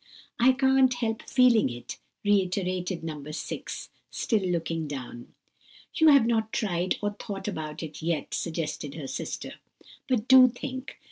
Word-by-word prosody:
"I 255 +2 +6
can't 265 0 +4
help 225 -2 -2
feeling 245 - +5
it," 120 0 -8 0.3
reiterated 185 -3 0
No. 155 -3 -5
6, 155 - -6 0.2
still 220 - 0
looking 165 -3 -2
down. 125 -4 -8 0.6
"You 320 - +4
have 280 -6 +7
not 220 -2 0
tried, 180 -4 0
or 205 - +1
thought 205 -1 -7
about 155 -5 -4
it 155 0 -8
yet," 160 -3 -2
suggested 155 -3 -3
her 155 -4 -6
sister; - - -5 0.5
"but 240 -3 +1
do 260 -1 +9
think. 260 +2 -6
190 Hz, 140 wpm, -27 LUFS, 160-240 Hz, 0.6 s, do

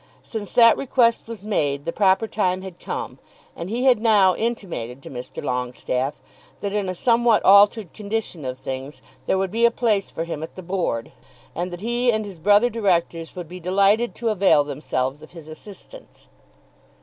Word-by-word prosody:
Since 215 -3 -6
that 230 -1 +6
request 240 -4 +2
was 225 -3 -8
made 145 -9 -1
the - - -1
proper 195 +2 +3
time 185 -3 -1
had 185 -2 -9
come, 460 0 -6 0.4
and 170 +2 -6
he 240 +4 -2
had 250 -5 +4
now 205 -5 +5
intimated 170 - -4
to - - -10
Mr. 125 -1 -7
Longestaffe 125 +2 -3 0.4
that 200 0 -3
in 205 -3 -1
a 185 - -3
somewhat 235 +1 +3
altered 200 -1 +5
condition 210 -6 -4
of 130 -1 -4
things 130 +2 -7 0.2
there - - +2
would 190 -1 -1
be 230 +2 -1
a 235 - +7
place 220 -4 0
for 165 - -4
him 165 -3 -5
at 160 - -8
the 185 - -9
Board, 170 -11 -2 0.4
and 175 +2 -3
that 175 0 -8
he 240 +2 +1
and 220 -1 -1
his 195 -5 -10
brother 205 +7 +4
directors 170 -6 -1
would 175 -2 -6
be 180 +3 -9
delighted 200 +6 +2
to 235 - -2
avail 195 -8 +4
themselves 140 -1 -3
of 155 - -14
his 165 -3 -11
assistance. 205 - -13
190 Hz, 185 wpm, -22 LUFS, 160-225 Hz, 0.4 s, a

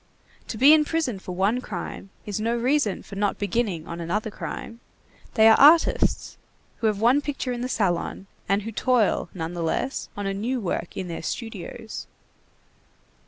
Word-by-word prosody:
To 220 - -5
be 275 +6 +8
in 310 -1 +6
prison 300 -9 -1
for 185 - -7
one 200 +7 +1
crime 195 -2 -6 0.2
is 205 -1 -3
no 230 +2 0
reason 250 -4 +1
for 200 - -10
not 205 0 0
beginning 205 -6 -1
on 170 0 -6
another 210 +6 -2
crime. 230 +2 -7 0.6
They 220 -2 +7
are 220 - +7
artists, 315 +4 +4 0.4
who 225 - 0
have 210 -2 0
one 245 +6 +4
picture 275 -3 -3
in 240 - -4
the 250 - -2
salon, 190 -3 -1 0.2
and 195 +1 +2
who 225 - -5
toil, 230 -6 +1
nonetheless, 170 +8 -2
on 205 - -3
a 195 - -1
new 235 +6 -2
work 180 -4 -3
in 185 - -3
their 170 - -5
studios. 225 +2 -6
220 Hz, 165 wpm, -25 LUFS, 190-250 Hz, 0.6 s, be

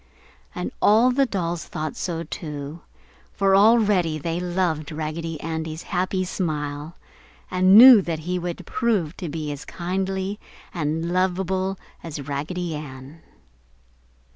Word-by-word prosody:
And - - -3
all 225 +5 +5
the 270 +1 +2
dolls 175 -5 -2
thought 155 -1 -5
so 165 -2 -3
too, 150 -1 -7 0.5
for 195 -1 +3
already 205 -6 +4
they 165 +3 -3
loved 175 -4 -1
Raggedy 155 +1 -4
Andy's 160 0 -4
happy 185 +1 -1
smile 150 -3 -3 0.6
and 185 +2 +6
knew 245 -2 +11
he 175 +1 -3
would 175 0 -5
prove 215 -11 0
to 175 -5 -5
be 150 -1 -4
as 145 - -7
kindly 190 +3 -3 0.3
and 165 +1 -2
lovable 190 +1 0 0.2
as 150 -4 -7
Raggedy 160 +5 -3
Ann. 145 +1 -9
170 Hz, 120 wpm, -23 LUFS, 155-190 Hz, 0.6 s, knew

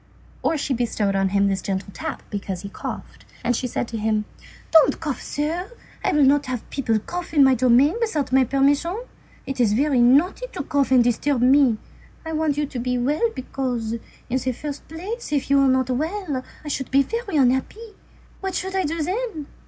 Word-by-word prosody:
Or 320 - +1
she 280 -1 -1
bestowed 225 -5 0
on 195 0 +2
him 200 0 +2
a - - +2
gentle 190 0 -3
tap - - -5
because 195 -3 -4
he 200 - -6
coughed, - - -7 0.2
and 245 - +1
she 250 - -2
said 240 - -2
to 225 - -4
him:— 215 0 0 0.5
"Don't 320 -2 +5
cough, 300 -5 -3
sir; 330 +7 -3 0.3
I - - +2
will 300 -1 +4
not 280 +1 +4
have 250 -3 -4
people 230 -5 0
cough 350 +10 -6
on 285 - +7
my 265 -1 +6
domain 255 +5 +4
without 315 - -1
my 265 0 +5
permission. 285 - +1 0.5
It's 245 -6 +1
very 270 +2 +2
naughty 300 - +3
to 280 - -3
cough 280 0 +1
and 255 -2 +5
to 240 - +4
disturb 260 +1 0
me. 260 -3 +5 0.5
I 320 - -4
want 310 -2 0
you 295 - +1
to 265 -3 -6
be 250 +1 -1
well, 295 - +1
because, 250 -4 -3 0.3
in 255 +2 0
the 255 0 -2
first 290 +3 -7
place, 375 +7 -6
if 280 -2 -1
you 280 - +6
were 275 - +4
not 260 -1 +2
well, 310 0 -2 0.2
I - - -6
should 275 -2 -3
be 275 +1 +4
very 440 - -3
unhappy. 275 - +1 0.5
What 385 -2 -3
should 380 +1 -3
I 380 - +1
do 320 +1 -1
then?" 385 -3 -3
275 Hz, 200 wpm, -23 LUFS, 245-315 Hz, 0.5 s, on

